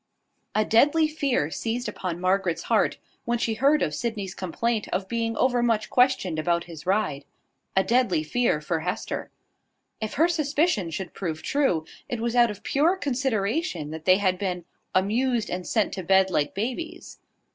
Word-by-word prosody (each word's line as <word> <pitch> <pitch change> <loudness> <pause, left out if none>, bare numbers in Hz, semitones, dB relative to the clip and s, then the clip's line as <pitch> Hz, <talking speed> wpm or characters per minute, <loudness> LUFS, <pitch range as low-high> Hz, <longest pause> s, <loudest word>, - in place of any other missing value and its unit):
A 215 0 +3
deadly 295 +8 +4
fear 275 - 0
seized 235 +6 -2
upon 175 -2 -4
Margaret's 185 -1 +1
heart, - - +2 0.3
when 240 0 +1
she 230 -1 0
heard 280 +7 +3
of 150 - -1
Sydney's 205 0 -3
complaint 215 +5 -2
of 190 +1 -2
being 230 0 -2
overmuch 240 -4 +1
questioned 245 - +2
about 170 +2 +1
his 165 -2 -11
ride, 190 -8 0 0.5
a 190 - +5
deadly 235 -10 +2
fear 195 -2 +1
for 165 +2 -1
Hester. 180 +6 -3 0.7
If 220 - -3
her 320 +5 +4
suspicion 305 - +1
should 175 +2 -5
prove 160 -4 -4
true, 265 - +1 0.2
it 240 - -2
was 235 +1 -1
out 240 -1 +5
of 205 -1 -8
pure 315 +7 +2
consideration 240 - -1
that 160 0 -7
they 185 0 +6
had 185 -2 +1
been 180 -3 -3 0.3
"amused 225 +5 +1
and 180 0 -4
sent 220 -3 +1
to 190 - -4
bed 190 +1 +4
like 145 -4 0
babies." 320 - -5
215 Hz, 165 wpm, -25 LUFS, 180-250 Hz, 0.7 s, they